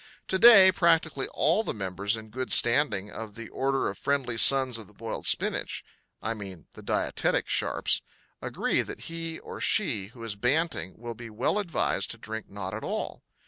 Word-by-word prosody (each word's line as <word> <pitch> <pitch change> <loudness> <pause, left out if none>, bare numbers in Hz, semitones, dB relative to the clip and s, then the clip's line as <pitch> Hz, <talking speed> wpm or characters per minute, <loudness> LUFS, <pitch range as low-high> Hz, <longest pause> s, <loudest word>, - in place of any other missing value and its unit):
To 190 - +1
day 200 -5 +9
practically 165 -6 +1
all 170 +8 +1
the - - -4
members 100 +2 -1
in 110 0 -11
good 130 +2 -5
standing 115 -5 +4
of 110 -2 -8
the 115 -1 -9
Order 135 0 -1
of 100 - -6
Friendly 135 -4 -1
Sons 130 -1 +5
of 110 - -9
the 105 - -19
Boiled 115 +1 -5
Spinach - - +1 0.4
I 110 - -1
mean 95 -6 -10
the - - -13
dietetic - - -1
sharps - - +1 0.4
agree - - -1
that - - -8
he 165 -1 -6
or - - -10
she 100 -2 +1
who 115 +1 -13
is 110 -3 -4
banting 125 - -1
will 120 +1 -7
be 115 0 -10
well 110 - -1
advised 180 -6 -1
to - - -4
drink 110 0 -8
not 100 -1 -6
at 110 - -6
all. - - -4
115 Hz, 185 wpm, -27 LUFS, 105-150 Hz, 0.4 s, day